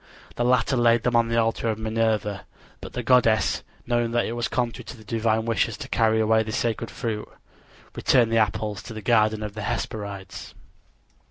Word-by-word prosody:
The 120 - -1
latter 125 +2 +2
laid 120 -1 +4
them 120 -1 +1
on 115 0 +4
the 115 0 0
altar 115 0 +1
of 110 - -1
Minerva; 110 -4 -1 0.3
but - - -9
the 125 - -3
goddess, 115 -3 +3 0.2
knowing 120 -1 +1
that 120 - +2
it - - -3
was 120 0 -2
contrary 120 -2 -2
to - - -9
the 110 - -14
divine 110 0 0
wishes 115 -2 0
to - - -7
carry 110 -1 +2
away 110 0 +3
this 110 0 -3
sacred 115 -1 -1
fruit, 110 -2 -4 0.6
returned 120 -4 +3
the 115 - +2
apples 105 -1 -1
to 110 - -9
the 110 - -7
garden 110 +2 +2
of 105 -1 -5
the 110 - -6
Hesperides. 100 -2 -5
110 Hz, 190 wpm, -24 LUFS, 110-115 Hz, 0.6 s, laid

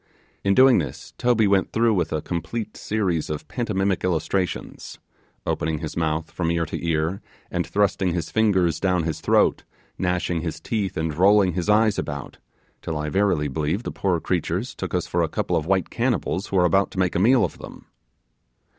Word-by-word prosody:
In 100 0 +2
doing 130 -3 +7
this 75 - -6
Toby 120 -3 +3
went 100 -1 +2
through 115 0 +3
with 90 -4 0
a 80 - -2
complete 90 +6 -4
series 95 -7 -1
of 75 -1 -5
pantomimic 100 -5 -1
illustrations 90 +1 -2 0.5
opening 80 0 -1
his 80 -1 -6
mouth 80 -1 -1
from 85 -2 -2
ear 85 -1 0
to 80 - -6
ear, 80 +2 0 0.3
and 85 -2 -1
thrusting 95 0 +1
his 85 -2 -3
fingers 95 -7 +2
down 90 -3 +1
his 80 -1 -3
throat, - - +3 0.4
gnashing 90 -2 0
his 80 -1 -4
teeth 100 +2 -2
and 80 -1 -1
rolling 95 +2 +4
his 90 +3 -2
eyes 105 0 +4
about, 70 -2 -6 0.4
till 80 - -3
I 75 0 -3
verily 90 -4 +1
believe 75 - -2
the - - -4
poor 90 -4 0
creatures 90 0 -2
took - - -4
us - - 0
for - - 0
a - - 0
couple - - -1
of 80 - -1
white 95 -2 +1
cannibals 95 +3 -1
who - - -4
were 90 -1 +4
about 95 +3 +3
to 95 - -4
make 90 -2 +1
a - - 0
meal 120 +6 +5
of - - -7
them. - - -11
90 Hz, 190 wpm, -23 LUFS, 80-100 Hz, 0.5 s, doing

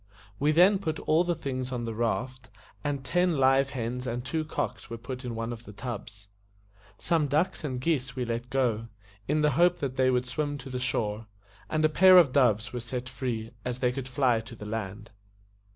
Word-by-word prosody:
We 145 +2 +3
then 185 +5 +5
put 160 -5 -2
all 160 +3 +3
the 175 -1 0
things 130 -4 -4
on 120 -2 -3
the 115 - -3
raft, 120 +2 -2 0.3
and 140 -2 -2
ten 175 -1 +2
live 135 +1 +4
hens 125 -1 -4
and 120 +1 -3
two 155 +4 -1
cocks 155 - -4
were 115 - -5
put 125 +2 -7
in 120 -2 -4
one 115 +1 -3
of 120 0 -10
the 105 - -10
tubs. 105 -3 -7 0.7
Some 160 -3 +1
ducks 155 +6 0
and 130 -4 -3
geese 135 -2 -1
we 125 -2 -2
let 120 +1 -3
go, 120 -4 0 0.4
in 150 +2 +2
the 150 0 +3
hope 175 +5 +4
that 135 -2 -4
they 130 0 +4
would 125 0 +1
swim 145 +3 -2
to 135 -1 -9
the 125 - -3
shore; 110 -4 -2 0.4
and 155 0 +2
a - - +7
pair 185 +4 +7
of 165 -7 +7
doves 120 -4 +2
were 125 - -2
set 125 +2 -5
free, 120 -3 -4
as 125 -1 -3
they 125 -1 +1
could 130 0 -5
fly 125 -3 +2
to 115 +1 -9
the 105 - -9
land. 105 0 -5
130 Hz, 210 wpm, -28 LUFS, 115-145 Hz, 0.7 s, a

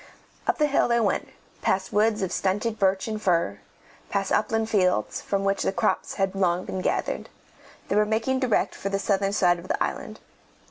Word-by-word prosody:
Up - - +2
the 300 - +3
hill 285 -1 +2
they 235 0 +2
went, 215 -3 0 0.3
past 190 0 0
woods 215 0 +2
of 190 - -2
stunted 210 +4 -1
birch 190 0 +2
and 215 -1 -3
fir, 170 - +1 0.5
past 195 -1 -1
upland 220 +1 +1
fields, 185 - +1
from 195 -1 -1
which 195 0 +1
the - - +1
crops 215 +2 -1
had 195 -1 0
long 185 -2 +1
been 190 - -4
gathered. - - -1 0.6
They - - -1
were 210 0 +4
making 225 +5 0
direct 255 -4 +1
for 195 - -4
the 195 - 0
southern 195 0 +1
side 175 -4 +3
of 175 - -11
the - - 0
island. - - -5
200 Hz, 190 wpm, -25 LUFS, 190-220 Hz, 0.6 s, were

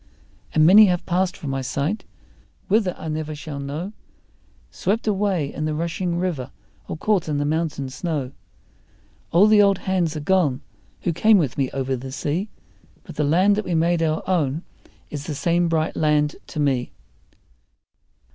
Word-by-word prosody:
And 155 0 +5
many 205 +5 +8
have 180 -2 0
passed 180 +1 0
from 145 -7 -5
my 135 0 -2
sight, 145 - -2 0.6
whither 200 -3 +2
I - - -7
never 155 0 -3
shall 145 -1 -7
know, 150 +9 -5 0.8
Swept 215 +4 -1
away 195 -8 0
in 155 - -3
the 155 -1 -1
rushing 170 +2 -2
river 170 -8 -2 0.4
or - - -5
caught 190 -2 0
in 150 - 0
the 145 - 0
mountain 155 -3 -1
snow; 145 -4 -3 1.0
All 180 +5 +6
the 215 -1 +6
old 200 -1 +4
hands 180 -5 -1
are - - -4
gone 155 -5 +2 0.4
who 175 - 0
came 215 +6 +5
with 145 -9 0
me 135 -2 0
over 135 -1 -2
the 130 +1 -7
sea, 160 +9 -2 0.5
But - - -11
the 150 - 0
land 180 +8 +4
that 215 - -2
we 175 - -1
made 170 +1 +2
our 155 -1 -1
own 160 -4 0 0.5
is 145 -1 -6
the 155 - -3
same 170 +3 +1
bright 160 -1 0
land 150 -1 +2
to - - -6
me. 135 -4 0
160 Hz, 170 wpm, -23 LUFS, 145-185 Hz, 1.0 s, many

